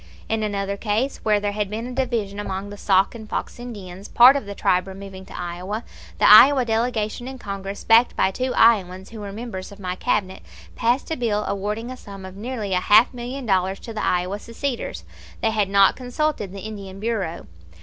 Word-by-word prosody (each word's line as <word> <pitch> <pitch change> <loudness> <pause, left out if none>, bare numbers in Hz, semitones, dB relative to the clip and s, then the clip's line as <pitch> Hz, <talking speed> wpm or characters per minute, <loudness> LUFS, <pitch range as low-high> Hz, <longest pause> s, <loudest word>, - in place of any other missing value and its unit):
In 225 0 -1
another 200 -1 -2
case, 225 +6 -1
where 210 -1 +1
there 205 0 -1
had 205 -1 -2
been 220 +3 -4
a 250 - -6
division 230 -6 -2
among 200 0 -4
the - - -7
Sac 195 -1 +2
and 220 -2 -10
Fox - - -4
Indians, 200 -6 -8
part 250 +3 +7
of 275 -7 -3
the 200 - -6
tribe 180 0 +1
removing 190 0 -9
to - - -9
Iowa, 180 +5 -4 0.3
the - - +4
Iowa 270 -2 +8
delegation 225 0 -1
in 265 0 -7
Congress, 200 -3 -6
backed 230 +2 +5
by 190 - +2
two 255 +6 -2
Iowans 190 -4 +3
who 225 - -9
were 200 -1 -6
members 205 -3 -7
of 200 - -13
my 180 -2 -3
Cabinet, 190 0 -1 0.3
passed 245 +7 0
a - - +1
bill 220 -5 0
awarding 210 +4 -3
a 255 - -7
sum 195 -4 -10
of 190 0 -10
nearly 215 -2 -4
a 180 - +3
half 215 +7 +5
million 250 +2 -6
dollars 190 -2 +1
to 230 - -8
the 215 - -3
Iowa 180 +3 0
seceders. 235 +3 -4 0.4
They 225 - +2
had 210 -3 0
not 200 0 +5
consulted 250 -4 -2
the 195 0 -8
Indian 195 -2 -8
Bureau. 205 -6 -3
210 Hz, 200 wpm, -23 LUFS, 195-235 Hz, 0.4 s, Iowa